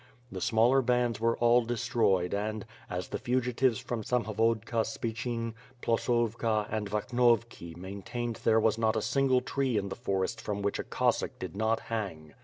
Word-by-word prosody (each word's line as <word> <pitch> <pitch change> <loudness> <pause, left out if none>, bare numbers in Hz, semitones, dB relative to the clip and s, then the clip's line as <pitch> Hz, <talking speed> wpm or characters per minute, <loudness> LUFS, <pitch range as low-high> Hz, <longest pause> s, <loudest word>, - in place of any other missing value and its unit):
The 95 - -5
smaller 120 +5 +4
bands 125 -2 +1
were 115 +1 +1
all 120 +1 +4
destroyed 115 -6 +1
and, 105 +2 -2 0.2
as 90 0 -4
the - - -3
fugitives 125 -1 +1
from 120 +1 -4
Samhovodka 115 0 0
Spichyn, 115 0 -3 0.3
Ploskova 115 -2 +1
and 105 -2 -2
Vakhnovki 115 -5 +1
maintained 100 +6 -5
there 110 0 +3
was 110 0 +2
not 110 0 +2
a 110 - +1
single 135 -2 +2
tree 130 -2 0
in 100 -1 -1
the - - -4
for 100 -5 -1
ests - - -3
from 100 -1 -3
which 100 - -1
a - - -1
Cossack - - 0
did - - -6
not 110 +2 +1
hang. 85 -10 -5
115 Hz, 165 wpm, -30 LUFS, 105-120 Hz, 0.3 s, smaller